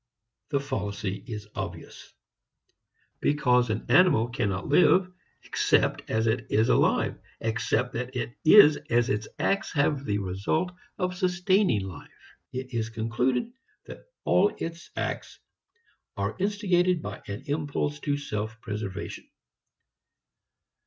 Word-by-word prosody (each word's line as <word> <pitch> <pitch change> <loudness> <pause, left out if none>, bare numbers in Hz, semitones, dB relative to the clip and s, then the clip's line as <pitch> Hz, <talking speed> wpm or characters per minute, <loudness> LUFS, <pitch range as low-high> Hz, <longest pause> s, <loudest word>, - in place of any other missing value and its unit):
The 140 -3 +1
fallacy 100 -7 -4
is 105 -3 -6
obvious. - - -7 1.1
Because 125 -5 +2
an 110 +1 -2
animal 140 -5 +5
cannot 100 -6 -2
live 180 +4 +4 0.3
except - - +1
as 110 0 +1
it 110 - 0
is 110 +3 +2
alive, - - +2 0.2
except 115 +2 -1
that 125 +2 -4 0.3
is 155 -3 +8
as 120 +1 +2
its 105 -4 -1
acts 200 +2 0
have 145 -2 +1
the 105 -5 -1
result 100 - -1 0.3
of 180 -1 -1
sustaining 180 - +2
life, 95 -3 -11 0.2
it 130 0 -6
is 115 -1 -1
concluded 120 - -1 0.3
that - - -11 0.2
all 415 - +4
its 165 +1 -6
acts - - -4 0.8
are - - -2
instigated 185 -3 +1
by 105 0 -6
an 100 0 -6
impulse 145 0 -2
to 145 -1 -1
self 110 -5 -4
preservation. 105 -2 -6
130 Hz, 120 wpm, -27 LUFS, 110-165 Hz, 1.1 s, is